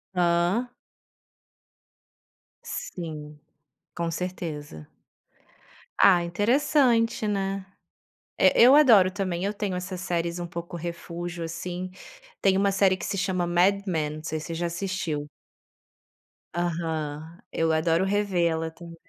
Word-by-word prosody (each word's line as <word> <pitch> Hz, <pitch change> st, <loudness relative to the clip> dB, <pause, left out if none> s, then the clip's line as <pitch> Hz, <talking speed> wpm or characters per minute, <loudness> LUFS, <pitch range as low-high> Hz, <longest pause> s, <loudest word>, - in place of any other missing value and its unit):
Hã. 175 Hz, +6 st, +2 dB, 2.0 s
Sim. 150 Hz, -4 st, -6 dB, 0.6 s
Com 170 Hz, -1 st, -2 dB
certeza. 160 Hz, -, -5 dB, 1.1 s
Ah, 180 Hz, -3 st, +6 dB
interessante, 230 Hz, -, +2 dB
né? 195 Hz, -1 st, -2 dB, 0.7 s
E -, -, +6 dB
eu 255 Hz, +4 st, +9 dB
adoro 225 Hz, -11 st, +7 dB
também, 185 Hz, -3 st, -2 dB
eu 205 Hz, -, -1 dB
tenho 200 Hz, -3 st, -3 dB
essas 180 Hz, 0 st, -5 dB
séries 170 Hz, -1 st, -2 dB
um 175 Hz, -, -3 dB
pouco 170 Hz, +1 st, -6 dB
refúgio, 170 Hz, 0 st, -5 dB
assim. 175 Hz, +3 st, -5 dB, 0.5 s
Tem 195 Hz, -1 st, +4 dB
1 195 Hz, +1 st, +3 dB
série 190 Hz, -1 st, +3 dB
que 180 Hz, -, -6 dB
se 200 Hz, -, -2 dB
chama 185 Hz, -1 st, 0 dB
Mad 185 Hz, +3 st, +3 dB
Men, 155 Hz, -4 st, 0 dB
não 155 Hz, -, -10 dB
sei 155 Hz, 0 st, -3 dB
se 155 Hz, -, -8 dB
você 165 Hz, -, -4 dB
já 170 Hz, +1 st, -1 dB
assistiu. 170 Hz, -4 st, -3 dB, 1.3 s
Aham. 160 Hz, -1 st, -3 dB
Eu 165 Hz, 0 st, +1 dB
adoro 165 Hz, +2 st, +2 dB
revê-la 175 Hz, -5 st, +1 dB
também. 170 Hz, 0 st, -12 dB
175 Hz, 120 wpm, -26 LUFS, 165-195 Hz, 2.0 s, eu